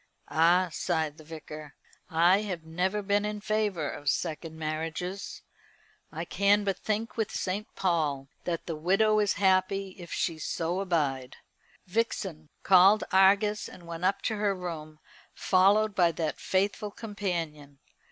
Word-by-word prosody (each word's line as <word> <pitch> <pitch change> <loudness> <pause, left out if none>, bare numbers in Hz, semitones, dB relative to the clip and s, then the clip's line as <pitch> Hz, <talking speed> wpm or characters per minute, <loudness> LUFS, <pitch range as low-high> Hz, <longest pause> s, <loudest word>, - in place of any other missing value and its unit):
"Ah!" 175 +3 +4
sighed 160 -3 -1
the - - -12
Vicar, 155 -1 -9 0.3
"I 175 +4 +4
have 185 -6 -4
never 185 +6 -1
been 205 +1 +1
in 210 0 -3
favour 205 -7 -1
of 145 0 -3
second 160 +1 -3
marriages. 160 +5 -4 0.7
I - - -5
can 200 +1 +3
but 195 -2 -1
think 220 +3 -2
with 220 -2 0
St. 195 +3 -3
Paul 155 -7 0 0.2
that 170 -2 -2
the 165 - -3
widow 195 +7 +3
is 205 -2 +2
happy 190 0 +2
if 175 -1 -10
she 165 -2 -1
so 170 +3 -2
abide." 145 -9 -1 0.5
Vixen 185 -6 -2
called 195 +3 +6
Argus 200 +2 +4
and 175 - -13
went 170 +1 -7
up 195 +2 +1
to 220 - -1
her 205 -1 +1
room, 160 -4 -6 0.4
followed 200 +3 +3
by 175 -3 +3
that 160 -1 -3
faithful 205 +2 0
companion. 170 -10 -5
185 Hz, 140 wpm, -28 LUFS, 160-200 Hz, 0.7 s, called